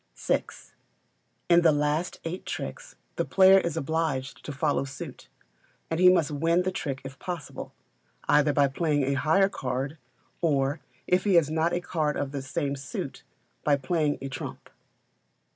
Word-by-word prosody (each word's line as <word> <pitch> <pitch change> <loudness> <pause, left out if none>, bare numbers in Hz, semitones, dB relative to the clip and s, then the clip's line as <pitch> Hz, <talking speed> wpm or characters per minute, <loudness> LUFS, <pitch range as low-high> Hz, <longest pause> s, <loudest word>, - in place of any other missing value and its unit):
vi. - - +1 1.0
In 175 0 +6
the 165 -2 +5
last 150 +4 0
eight 170 +3 -5
tricks - - -6 0.2
the - - +2
player 190 0 +6
is 170 -3 -2
obliged 160 -4 -2
to - - -5
follow 145 0 0
suit, 130 -1 -8 0.6
and 160 - 0
he 180 0 +8
must 170 -4 +3
win 165 +4 +2
the 185 - -1
trick 140 -7 -4
if 135 +1 -9
possible, 175 -4 -6 0.6
either 150 0 +4
by 145 -1 +4
playing 145 +1 0
a 140 +1 +1
higher 160 +8 +3
card, 135 -2 -4 0.4
or, 145 -2 +1 0.3
if 180 +1 +2
he 200 -3 +3
has 160 -3 +4
not 160 +2 +1
a 175 - 0
card 155 -4 -1
of 140 -1 -2
the 140 -1 -4
same 140 +1 -2
suit, 135 -1 -6 0.4
by 145 - +4
playing 145 +2 0
a - - -3
trump. 135 -1 -7
150 Hz, 160 wpm, -27 LUFS, 140-170 Hz, 1.0 s, he